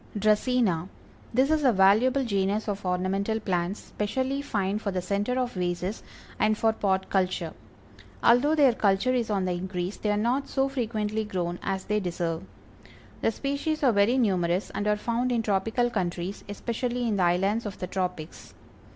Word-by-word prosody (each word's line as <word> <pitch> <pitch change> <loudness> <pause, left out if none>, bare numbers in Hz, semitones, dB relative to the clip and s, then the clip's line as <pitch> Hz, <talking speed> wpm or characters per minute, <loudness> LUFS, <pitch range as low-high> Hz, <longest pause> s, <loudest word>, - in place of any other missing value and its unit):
DRACÆNA. 210 -4 +2 0.4
This 260 +5 +3
is 310 -1 +2
a 260 - +5
valuable 220 +7 +4
genus 200 0 0
of 200 -2 -3
ornamental 195 +4 0
plants, 185 -1 -1
specially 260 +6 -2
fine 205 -6 -1
for 210 - -3
the 185 -2 -1
center 200 +7 -1
of 250 -1 -1
vases, 180 +2 -2 0.4
and 215 0 +2
for 225 0 +2
pot 190 -3 0
culture. 185 -4 0 0.7
Although 270 +6 +5
their 280 -5 +5
culture 205 +4 +2
is 240 -3 0
on 195 -3 0
the 185 - 0
increase, 180 +1 -3
they 210 - -2
are 205 - +2
not 245 +6 0
so 270 0 +1
frequently 220 -5 -2
grown 175 -4 -3
as 190 -1 -3
they 210 0 +1
deserve. 170 -3 -2 0.8
The - - +3
species 280 +6 -2
are 260 - +5
very 205 +5 +3
numerous, 185 -5 +1
and 205 - -2
are 210 0 +2
found 235 +3 -1
in 235 -2 +1
tropical 225 +4 +1
countries, 180 -2 -3
especially 240 +3 -2
in 210 -3 0
the 185 - +2
islands 195 +6 +1
of 200 - -7
the - - -4
tropics. 180 -4 -5
210 Hz, 170 wpm, -27 LUFS, 185-240 Hz, 0.8 s, a